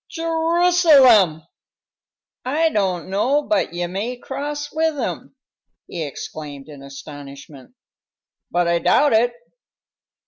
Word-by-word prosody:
"Je 330 - -6
ru 330 +2 +1
salem! 255 - +5 1.0
I 310 +6 +1
don't 190 - -1
know 255 +10 +1
but 210 - 0
ye 175 +1 -3
may 205 +8 -4
cross 290 +3 -5
with 320 -1 0
'em!" 265 +1 -5 0.5
he 170 - -5
exclaimed, 145 0 -8
in 145 -3 -12
astonishment. 140 - -12 0.7
"But 175 0 0
I 170 0 +2
doubt 290 - +3
it. 240 +2 +3
220 Hz, 115 wpm, -20 LUFS, -, 1.0 s, salem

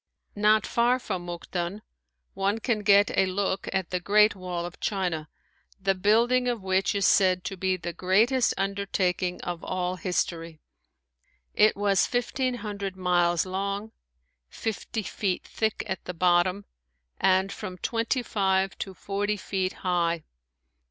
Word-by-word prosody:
Not 210 +1 +4
far 240 +2 +2
from 185 -8 -5
Mukden 175 +3 -4 0.5
one 200 +2 0
can 225 0 0
get 205 -1 +4
a 190 - +3
look 190 0 -1
at 190 -2 -2
the 180 - 0
great 210 +4 +4
Wall 180 -2 -4
of 175 - -9
China, 180 -7 -2 0.5
the 195 0 +2
building 230 +6 +3
of 235 -5 -1
which 190 +2 +1
is 200 - +1
said 185 -2 +4
to 195 - -4
be 185 0 0
the 175 -1 -5
greatest 220 +9 +2
undertaking 195 -2 -1
of 175 -1 -5
all 185 0 -2
history. 165 -2 -2 0.9
It 215 +1 +4
was 200 -2 +2
fifteen 250 +1 -1
hundred 200 -2 -4
miles 175 -2 +2
long, 200 +3 -3 0.6
fifty 220 0 -4
feet 190 -2 -2
thick 220 -1 -2
at 190 - -4
the 180 - -5
bottom 180 +3 +2 0.5
and 190 +1 +3
from 190 -3 -6
twenty 230 +5 -1
five 190 -3 +1
to 190 - -5
forty 205 +2 -2
feet 190 -1 -2
high. 170 -2 +1
195 Hz, 140 wpm, -27 LUFS, 180-210 Hz, 0.9 s, Not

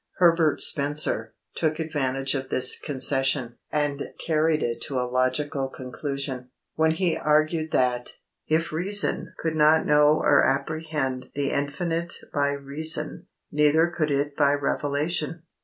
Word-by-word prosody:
Herbert 165 -3 +3
Spencer 140 -6 +3 0.2
took 155 -1 -1
advantage 135 -4 -1
of 135 -1 -4
this 130 0 +5
concession, 135 -3 0
and 145 -1 -1 0.2
carried 155 -1 +1
it 115 0 -3
to 135 -4 -2
a 125 - -1
logical 135 +2 -1
conclusion, 130 0 -5 0.2
when 160 0 +2
he 170 +1 0
argued 155 +1 +1
that, 125 -3 0 0.3
if 165 +2 0
reason 190 +6 +1
could 160 -1 -2
not 155 +1 +4
know 150 0 +4
or 145 -2 +3
apprehend 140 -2 -2
the 140 -1 -1
Infinite 165 +4 -2 0.2
by 145 0 +1
reason, 140 +3 -4 0.2
neither 155 +3 +3
could 155 -2 0
it 140 0 -1
by 145 -1 +3
revelation. 150 +3 -1
145 Hz, 130 wpm, -25 LUFS, 135-160 Hz, 0.3 s, this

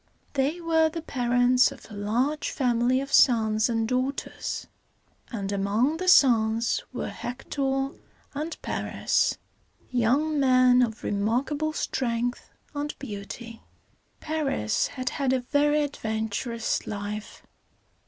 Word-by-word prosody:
They 285 +5 0
were 325 -1 +3
the 330 0 -6
parents 245 -1 +3
of 275 -3 -12
a - - -9
large 240 +9 -1
family 250 -1 +1
of 275 0 -7
sons 220 -2 +4
and 225 -1 0
daughters; 255 +3 -2 0.7
and 200 -5 -3
among 210 +10 +1
the 370 +2 -4
sons 230 -8 +4
were - - -4
Hec´tor 270 +2 -3 0.4
and 305 +3 -4
Par´is, - - 0 0.5
young 275 +6 +2
men 255 -2 +5
of 230 -2 -1
remarkable 255 +9 0
strength 245 -4 -2 0.2
and 290 0 -4
beauty. 225 -1 -8 0.6
Paris 295 - 0
had 255 -1 -3
had 270 -2 0
a 260 - +1
very 295 +3 +2
adventurous 225 -3 -2
life. 210 +1 -6
250 Hz, 115 wpm, -26 LUFS, 225-285 Hz, 0.7 s, men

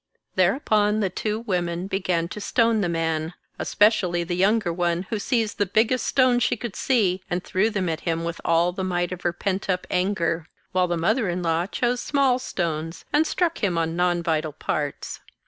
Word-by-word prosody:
Thereupon 210 +2 +2
the 195 -4 0
two 215 +3 -2
women 175 -5 -2
began 185 -4 -1
to 210 - -7
stone 230 0 +2
the 175 - 0
man, 165 0 -1 0.2
es - - -4
pecially 185 -5 +3
the 175 +1 -2
younger 195 -1 +2
one, 175 0 0
who 220 - -1
seized 225 -1 -1
the 205 - +2
biggest 225 +6 +2
stones 255 -2 +3
she 250 - +1
could 225 -2 -6
see 195 -8 +1
and 175 +1 -2
threw 200 +3 +1
them 195 -4 -1
at 160 -1 -1
him 165 -1 -2
with 170 0 -4
all 170 +1 +3
the 190 +1 -4
might 175 -1 -1
of 180 -1 -5
her 175 - +1
pent 190 +2 -3
up 180 -1 0
anger; 175 -3 0 0.2
while 185 0 +2
the 175 -1 -1
mother 210 +6 +1
in 175 +1 -2
law 165 +1 +1
chose 245 +3 -1
small 270 -3 +2
stones 165 -7 -3
and 310 +2 +4
struck 340 -2 0
him 180 -4 +1
on 165 0 0
non 175 -1 +1
vital 155 -2 -1
parts. 145 -1 -3
185 Hz, 200 wpm, -24 LUFS, 170-215 Hz, 0.2 s, and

